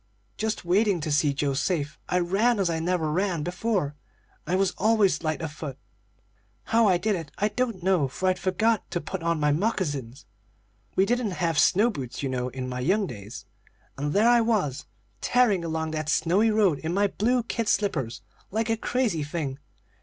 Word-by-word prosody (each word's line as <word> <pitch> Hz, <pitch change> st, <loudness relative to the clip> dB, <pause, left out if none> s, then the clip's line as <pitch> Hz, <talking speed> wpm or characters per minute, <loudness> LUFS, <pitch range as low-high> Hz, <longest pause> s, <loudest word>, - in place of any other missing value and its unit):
"Just 220 Hz, -3 st, -3 dB
waiting 195 Hz, +1 st, +2 dB
to 150 Hz, -, -3 dB
see 145 Hz, 0 st, +3 dB
Joe 140 Hz, 0 st, -1 dB
safe, 150 Hz, +2 st, -1 dB
I 180 Hz, -, +2 dB
ran 200 Hz, +7 st, +2 dB
as 185 Hz, -3 st, +1 dB
I 165 Hz, -, -1 dB
never 165 Hz, -2 st, 0 dB
ran 180 Hz, -2 st, 0 dB
before, 180 Hz, -3 st, -1 dB, 0.5 s
and 175 Hz, -, -1 dB
I -, -, +4 dB
was 190 Hz, 0 st, +1 dB
always 215 Hz, -2 st, +3 dB
light 155 Hz, 0 st, -2 dB
of 160 Hz, -, -3 dB
foot. 145 Hz, -3 st, -7 dB, 0.9 s
How 230 Hz, -1 st, +3 dB
I 185 Hz, -3 st, +4 dB
did 210 Hz, +3 st, 0 dB
it 165 Hz, -4 st, -6 dB
I 210 Hz, +2 st, +1 dB
don't 215 Hz, -4 st, -2 dB
know, 185 Hz, -7 st, +3 dB
for 185 Hz, +8 st, -3 dB
I'd 185 Hz, -1 st, +1 dB
forgot 215 Hz, +4 st, +1 dB
to 175 Hz, -, -2 dB
put 175 Hz, +3 st, -5 dB
on 170 Hz, -1 st, 0 dB
my 150 Hz, 0 st, +2 dB
moccasins 145 Hz, -, -2 dB, 0.7 s
(we 190 Hz, -, +4 dB
didn't 235 Hz, -4 st, -1 dB
have 165 Hz, -3 st, +1 dB
snow 215 Hz, +6 st, +4 dB
boots, 135 Hz, -, -6 dB
you 135 Hz, -, -1 dB
know, 125 Hz, -1 st, -2 dB
in 130 Hz, 0 st, -5 dB
my 125 Hz, 0 st, -4 dB
young 190 Hz, +11 st, +2 dB
days), 105 Hz, -, -9 dB, 0.5 s
and 145 Hz, +2 st, -2 dB
there 210 Hz, +7 st, +3 dB
I 240 Hz, -1 st, +6 dB
was, 195 Hz, -, 0 dB, 0.3 s
tearing 225 Hz, -8 st, +3 dB
along 160 Hz, -1 st, -2 dB
that 155 Hz, -1 st, -3 dB
snowy 180 Hz, +8 st, +3 dB
road 205 Hz, -9 st, +3 dB
in 165 Hz, +2 st, -3 dB
my 200 Hz, +1 st, +3 dB
blue 235 Hz, +5 st, +1 dB
kid 230 Hz, -1 st, -3 dB
slippers 135 Hz, -, 0 dB, 0.3 s
like 225 Hz, +2 st, -1 dB
a 225 Hz, -, +1 dB
crazy 225 Hz, -8 st, 0 dB
thing. 145 Hz, -3 st, -4 dB
180 Hz, 190 wpm, -26 LUFS, 150-210 Hz, 0.9 s, I